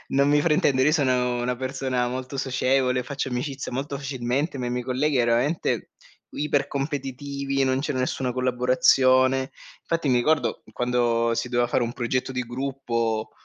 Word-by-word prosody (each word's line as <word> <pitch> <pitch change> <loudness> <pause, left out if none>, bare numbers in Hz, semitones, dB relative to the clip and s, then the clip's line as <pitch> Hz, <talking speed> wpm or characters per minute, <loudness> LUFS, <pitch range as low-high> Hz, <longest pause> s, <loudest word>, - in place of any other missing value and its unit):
non 140 +1 +4
mi 150 0 +4
fraintendere, 145 -4 +3
io 150 - +4
sono 125 -5 +1
una 125 0 -1
persona 130 -1 -1
molto 130 +2 -5
socievole, 130 -1 +1
faccio 140 -1 -4
amicizia 130 +2 -4
molto 140 +2 -3
facilmente, 135 +2 -2
ma 125 -1 -3
i - - -2
miei 125 0 -2
colleghi 135 +3 +1
è 120 - +3
veramente 125 +8 0 0.4
ipercompetitivi, 140 -1 -2
non 130 0 +1
c'è 150 - -2
nessuna 130 -1 -1
collaborazione. 130 +1 +3 0.3
Fatti 165 -3 -1
mi 125 - +3
ricordo 150 +5 +1
quando 120 -1 +1
si 115 +2 -2
doveva 120 -1 +1
fare 120 - +1
un 115 - -2
progetto 125 +2 -2
di 125 -1 -2
gruppo, 120 -3 -2
130 Hz, 155 wpm, -25 LUFS, 125-140 Hz, 0.4 s, non